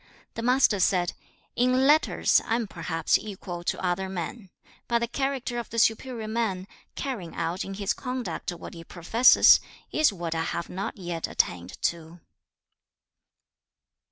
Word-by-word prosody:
The - - -5
Master 250 -3 +3
said, 180 -1 +2 0.4
'In 255 +2 +3
letters 300 +3 +4
I 225 - +1
am 235 -1 -1
perhaps 165 -4 0
equal 185 -4 -7
to - - -1
other 185 +2 -1
men, 190 +3 -5 0.4
but 235 - +2
the 235 0 -1
character 265 -2 -2
of 235 - -6
the 230 - -6
superior 225 0 +1
man, 215 -5 -1 0.3
carrying 220 -12 -5
out 175 +3 -2
in 195 - -6
his 200 0 -1
conduct 250 -6 -4
what 175 - -9
he 165 -1 -9
professes, 185 +9 +6 0.3
is 310 -5 +3
what 170 -4 -4
I 160 - -1
have 165 +1 -3
not 190 +2 -4
yet 175 -3 -4
attained 90 0 -1
to.' 170 0 -2
195 Hz, 150 wpm, -26 LUFS, 175-240 Hz, 0.4 s, professes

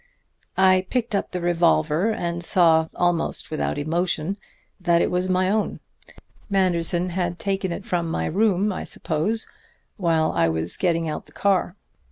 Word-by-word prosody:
"I 185 -1 +4
picked 240 -3 -1
up 200 - -1
the 180 - -4
revolver 165 - +2
and 170 -4 -3
saw, 165 -2 +4
almost 175 -3 -1
without 155 - -2
emotion, 170 +4 -1 0.4
that 175 -2 +2
it - - +1
was 180 +1 0
my 185 0 +2
own 210 +2 -1 0.7
Manderson 180 -2 +2
had 175 -1 -2
taken 195 0 -2
it 195 +4 -5
from 175 -6 -1
my - - -1
room, 200 +1 +1
I - - -5
suppose, 190 +9 -1 0.5
while 165 -5 +1
I 85 -1 +2
was 80 +1 0
getting 165 -3 0
out 155 - -5
the - - -19
car. 195 -2 +1
175 Hz, 155 wpm, -23 LUFS, 165-190 Hz, 0.7 s, I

